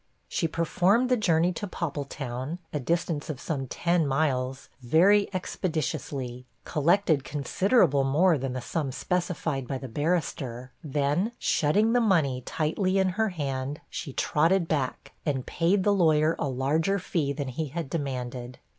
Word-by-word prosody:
She 165 - 0
performed 185 +9 +2
the 250 - +4
journey 180 -5 +2
to 205 - -4
Poppletown, 140 -4 -4 0.2
a 150 - 0
distance 165 +1 -1
of 145 -4 -4
some 140 -5 -3
ten 170 +2 +1
miles, 135 -2 0
very 185 +11 +4
expeditiously; 145 -8 -3 0.2
collected 160 -1 +2
considerable 150 - +2
more 155 +4 +3
than 130 -1 -3
the 130 - -3
sum 140 +2 -2
specified 160 -5 -2
by 135 - -2
the 130 - -7
barrister; 135 -3 -2
then, 150 - 0
shutting 210 +9 +2
the 245 - +4
money 155 - +2
tightly 185 +5 0
in 190 -1 +3
her 220 +4 0
hand, 140 -4 -3
she 140 - -5
trotted 165 +6 +2
back, 140 -6 -2
and 135 -5 -1
paid 185 +3 +1
the 205 - +3
lawyer 160 -4 +3
a 140 - 0
larger 150 +9 +1
fee 165 -6 -1
than 140 -2 -3
he 155 +5 -3
had 160 +2 -4
demanded. 125 -4 -4
155 Hz, 145 wpm, -27 LUFS, 135-180 Hz, 0.2 s, the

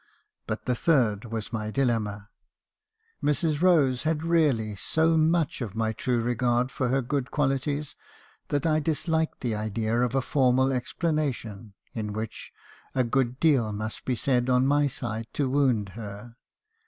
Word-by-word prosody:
But - - -4
the 125 - +1
third 120 -7 +2
was 115 0 -5
my 110 -1 -2
dilemma. 110 -5 -1 0.9
Mrs. 150 +1 +1
Rose 150 -9 +4
had 155 0 -1
really 145 -11 +2
so 160 - +1
much 160 -2 +2
of 110 -4 -5
my 110 0 0
true 120 +2 0
regard 120 +1 +1
for 130 - -1
her 135 +2 +1
good 135 +1 -2
qualities, 145 +1 -1 0.5
that 145 0 -1
I 155 -1 +3
disliked 160 +1 -1
the 120 -3 -1
idea 110 +2 -1
of 125 +1 0
a 135 - +3
formal 130 -1 +3
explana 150 +3 0
tion, 105 -2 -10 0.2
in 105 -2 -4
which 110 +1 -6 0.4
a 130 - +3
good 125 +1 0
deal 135 -10 +3
must 110 +1 -5
be 130 - -1
said 125 0 +1
on 125 0 +4
my 145 +1 +3
side 115 -4 -4
to 145 - 0
wound 130 -8 +2
her. 105 +2 -9
125 Hz, 155 wpm, -27 LUFS, 110-145 Hz, 0.9 s, Rose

